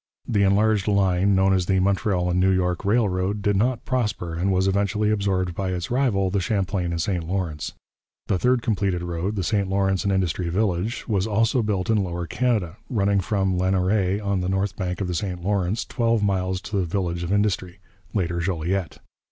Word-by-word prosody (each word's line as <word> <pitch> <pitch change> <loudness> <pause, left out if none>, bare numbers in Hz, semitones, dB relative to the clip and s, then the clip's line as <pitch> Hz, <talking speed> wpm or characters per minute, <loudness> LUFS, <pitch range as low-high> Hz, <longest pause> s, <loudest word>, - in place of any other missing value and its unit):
The 105 -4 +1
enlarged 100 +1 +3
line, 100 -1 +3
known 95 0 +3
as 90 -2 +1
the 95 -1 +2
Montreal 95 -2 +1
and 90 - +1
New 95 +1 +4
York 90 -2 0
Railroad, 100 -2 +1
did 105 -1 +2
not 120 +4 0
prosper, 105 -9 -1
and 90 +4 0
was 95 0 +2
eventually 100 +2 +1
absorbed 95 -4 0
by 95 +2 -3
its 90 +3 -4
rival, 110 -8 +1
the 100 - +1
Champlain 95 -2 -1
and 85 - -2
St 90 0 -1
Lawrence. 85 -4 -3 0.5
The 95 - 0
third 125 +1 +2
completed 100 -6 0
road, 85 +4 -3
the 95 - -1
St 100 +1 0
Lawrence 95 0 +1
and 100 - +1
Industry 90 -2 0
Village, 100 +3 -1
was 100 -3 0
also 115 +3 +2
built 105 -3 -1
in 105 -3 +2
Lower 85 -1 -3
Canada, 105 -3 -1
running 100 -4 +2
from 95 -1 0
Lanoraie 95 +1 +1
on 100 -2 -1
the 90 - -1
north 95 +1 -1
bank 90 0 -3
of 95 - -1
the 90 - -2
St 90 0 -3
Lawrence 100 +1 0
twelve 115 -3 +1
miles 95 -2 0
to 105 0 -4
the 95 - +1
village 85 -1 -2
of 85 +1 -3
Industry, 100 -3 0 0.3
later 85 -4 -1
Joliette. 90 +1 -2
95 Hz, 195 wpm, -24 LUFS, 90-105 Hz, 0.5 s, New